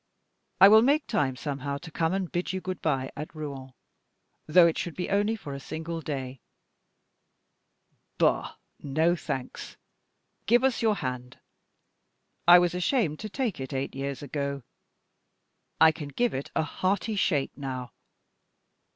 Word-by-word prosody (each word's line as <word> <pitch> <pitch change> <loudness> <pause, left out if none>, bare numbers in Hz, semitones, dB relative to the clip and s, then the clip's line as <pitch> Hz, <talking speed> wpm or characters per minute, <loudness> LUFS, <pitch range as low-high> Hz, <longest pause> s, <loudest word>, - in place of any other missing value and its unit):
I 195 - +10
will 220 +2 +8
make 285 +5 +3
time 135 -3 0
somehow 140 0 -4
to 165 +3 -11
come 165 +1 0
and 190 -2 -2
bid 175 +2 -2
you 190 - -2
good 185 -1 -5
by 135 -4 -1
at 150 +3 -7
Rouen, 135 -4 -7 0.7
though 170 +3 +7
it 165 - +2
should 175 - -4
be 180 - -4
only 205 +3 +2
for 145 -10 -8
a 140 - -5
single 160 +3 -5
day. 135 -4 -5 1.8
Bah! - - +1 0.2
no 160 +5 +1
thanks. 130 -6 -6 0.7
Give 240 +3 +4
us 265 -3 +1
your 220 -2 +3
hand. 125 -6 -5 1.1
I 175 +1 +10
was 175 -1 +2
ashamed 180 - 0
to 215 - -6
take 230 - -2
it 130 +1 -6
eight 135 +1 -3
years 135 0 -4
ago 140 -2 -3 1.2
I 160 0 +8
can 155 -2 -7
give 240 - 0
it 135 - -4
a - - +2
hearty 195 +7 -1
shake 150 -8 0
now! 130 -4 -5
160 Hz, 150 wpm, -27 LUFS, 140-185 Hz, 1.8 s, I